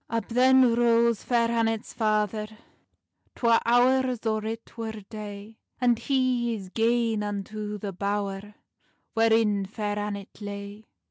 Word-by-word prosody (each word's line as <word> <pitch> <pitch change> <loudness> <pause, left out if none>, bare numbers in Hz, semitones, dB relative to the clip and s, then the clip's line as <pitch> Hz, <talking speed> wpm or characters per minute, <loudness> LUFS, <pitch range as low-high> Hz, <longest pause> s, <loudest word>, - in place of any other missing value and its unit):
Up 230 +1 -2
then 255 0 +5
rose 235 -1 +3
Fair 235 -1 +1
Annet's 225 -1 -1
father, 215 -1 0 0.9
Twa 230 -2 +3
hours 250 0 +3
or 215 -1 0
it 225 +1 -6
wer 225 -1 -4
day, 210 0 -9 0.2
And 240 -2 +3
he 255 -3 +1
is 195 -3 -8
gane 230 0 +1
unto 210 +1 -4
the 200 -1 -5
bower 200 +1 -3 0.6
Wherein 225 -3 +2
Fair 205 0 -3
Annet 205 0 -6
lay. 200 +1 -7
220 Hz, 125 wpm, -26 LUFS, 205-235 Hz, 0.9 s, then